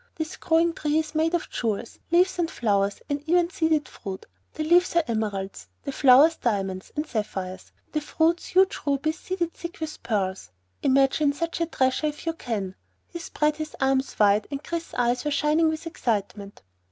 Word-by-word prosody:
"This 315 -1 -4
growing 330 +1 +2
tree 300 -1 0
is 315 -1 -1
made 320 +2 +2
of 345 - -2
jewels; 225 -1 -3
leaves 355 +2 +3
and 335 -1 +1
flowers 200 -6 0
and 285 -1 -2
even 350 0 +3
seeded 320 -5 +1
fruit. 195 -3 -8 0.3
The 310 - -2
leaves 345 +3 +4
are 340 - +5
emeralds; 205 -4 -3 0.2
the 275 - -3
flowers, 275 +4 +6
diamonds 195 -5 -2
and 300 +1 -1
sapphires; 190 -6 -4 0.2
the 305 - -1
fruits, 325 +3 +1
huge 380 +1 +3
rubies 295 +3 0
seeded 350 -3 -2
thick 340 0 -8
with 315 -1 -5
pearls. 190 - -2 0.3
Imagine 275 +2 +3
such 335 +3 -3
a 335 - +1
treasure 260 0 +1
if 300 +1 -6
you 330 - 0
can!" 215 - -4 0.4
He 340 - -7
spread 300 -2 0
his 310 -1 -5
arms 265 0 +1
wide 205 0 +4
and 280 +1 -5
Chris's 335 0 -5
eyes 245 0 +1
were 295 - 0
shining 300 +3 +3
with 315 +1 -4
excitement. 205 - -3
295 Hz, 175 wpm, -25 LUFS, 220-325 Hz, 0.4 s, flowers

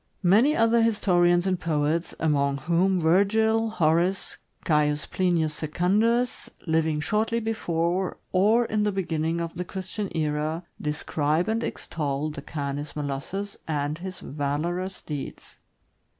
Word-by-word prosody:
Many 220 - +5
other 230 +1 +4
histo 210 -5 +2
rians 175 0 +4
and 185 -2 0
poets, 160 0 0
among 140 -3 +1
whom 175 +6 +2
Virgil, 220 +6 +3
Horace, 175 0 +1 0.3
Caius 150 -2 +2
Plinius 170 -4 +1
Secundus, 205 +11 +1 0.2
living 160 -2 +1
shortly 215 +8 0
before 180 -5 -1
or 215 +6 +4
in 215 -1 0
the 210 0 +2
beginning 165 -3 -1
of 170 -1 -3
the 180 - -4
Christian 190 +2 -5
era, 155 +2 -1 0.2
describe 150 +2 0
and 225 +1 0
extol 150 -1 -3
the - - -7
Canis 145 0 -4
molossus 150 +8 -4
and 150 0 -2
his 185 +1 -7
valorous 165 +6 -3
deeds. 145 -3 -7
170 Hz, 125 wpm, -26 LUFS, 150-195 Hz, 0.3 s, Many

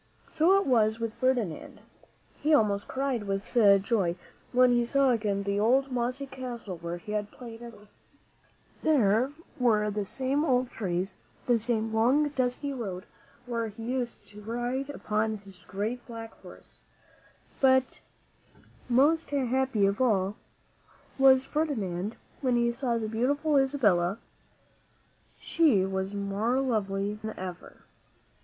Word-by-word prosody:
So 345 +5 +4
it 395 - -2
was 225 -3 +2
with 230 -1 -3
Ferdinand, 245 - -1 0.6
He 305 +1 +4
almost 205 -5 +1
cried 265 -5 -2
with 195 +4 -4 0.3
joy 195 -6 +1 0.4
when 250 0 +5
he 240 0 +3
saw 275 +2 +3
again 210 -4 0
the 200 0 -1
old, 260 +5 +2
mossy 250 +3 -2
castle 245 -8 -7
where 170 +1 -5
he 210 +4 -9
had 210 -1 -2
played 235 -1 -11
as 235 0 -8
a - - -16
boy. 210 +1 -18 0.9
There 255 -4 +3 0.3
were 210 -4 +2
the 205 0 -2
same 270 +7 -1
old 255 -4 +1
trees, 185 -2 -3 0.3
the 240 -2 +3
same 225 -1 -1
long, 260 +7 +3
dusty 275 +1 -2
road 200 -7 -5 0.4
where 230 -2 -2
he 220 +1 -9
used 245 0 -4
to 205 +1 -12
ride 240 +5 -3
upon 215 -5 -1
his 195 -2 -15
great 220 +6 -3
black 225 -1 -8
horse; - - -15 0.8
but 260 -1 +3 0.9
most 295 +7 +3
happy 265 -5 +1
of 200 +5 0
all 205 -5 +2 0.8
was 265 -1 +6
Ferdinand 220 - -2 0.3
when 255 -3 +1
he 235 0 +2
saw 245 -1 -1
again 230 - -2
the - - -2
beautiful 285 +6 +1
Isabella. 215 -10 +2 1.2
She 270 - +3
was 190 +1 -3
more 200 +5 0
lovely 205 -6 -1
than 220 +1 -7
ever. 180 -1 -8
235 Hz, 140 wpm, -28 LUFS, 205-260 Hz, 1.2 s, was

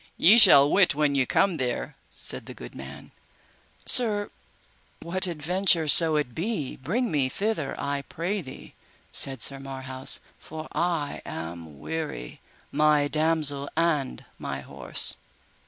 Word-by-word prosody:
Ye 215 +8 +6
shall 140 -10 +8
wit 180 -1 +3
when 150 -1 +1
ye 135 -3 +1
come 190 -4 +1
there, 125 -3 -3 0.2
said - - -6
the - - -9
good - - -11
man. 70 +1 -11 0.7
Sir, 210 -4 +3 0.7
what 185 +3 -3
adventure 170 +1 0
so 160 +2 +6
it 145 -5 -2
be, 170 - -4
bring 220 - -2
me 140 -4 0
thither 195 -3 -3
I 140 0 -3
pray 180 +7 -4
thee, 130 -5 -12 0.4
said 135 -3 +1
Sir 135 -1 -2
Marhaus; 130 -1 0 0.2
for 155 0 -9
I 170 -4 -2
am 80 -2 -8
weary, 155 - -6 0.3
my 150 0 +2
damosel, 155 -2 0
and 155 -5 -1
my 70 -1 -5
horse. 65 -2 0
150 Hz, 135 wpm, -25 LUFS, 130-170 Hz, 0.7 s, shall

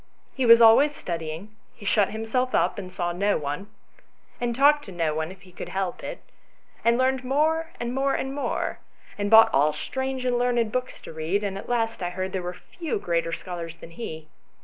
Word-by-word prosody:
He 260 -3 0
was 230 0 +9
always 275 +7 +6
studying: 170 +4 -5 0.2
he 205 - -13
shut 200 -1 +3
himself 225 +4 -1
up - - +1
and 185 -2 -7
saw 175 -1 -2
no 200 +4 +1
one, 150 +7 -4 0.7
and 240 -1 -1
talked 290 +3 +5
to 195 - -9
no 165 -3 0
one 160 +2 -2
if 190 -1 -14
he 180 - -16
could 180 - -8
help 190 -2 -3
it, - - -6 0.6
and 235 +1 +4
learned 260 0 +1
more 315 +5 +1
and 240 0 -3
more 270 +1 +1
and 265 0 -3
more, 285 - -2 0.4
and 205 0 -2
bought 225 +1 +8
all 150 +3 +4
strange 265 - -3
and 245 -1 +1
learned 240 -3 +1
books 255 +2 -3
to - - -10
read, 160 +6 -1
and 200 -2 -2
at 195 - -8
last 230 -3 0
I 175 - -1
heard 185 +1 -4
that - - -18
there 190 - -1
were 180 0 -5
few 330 - -5
greater 170 -3 -1
scholars 170 -2 -6
than 165 - -12
he. 160 -5 -7
205 Hz, 210 wpm, -25 LUFS, 175-250 Hz, 0.7 s, was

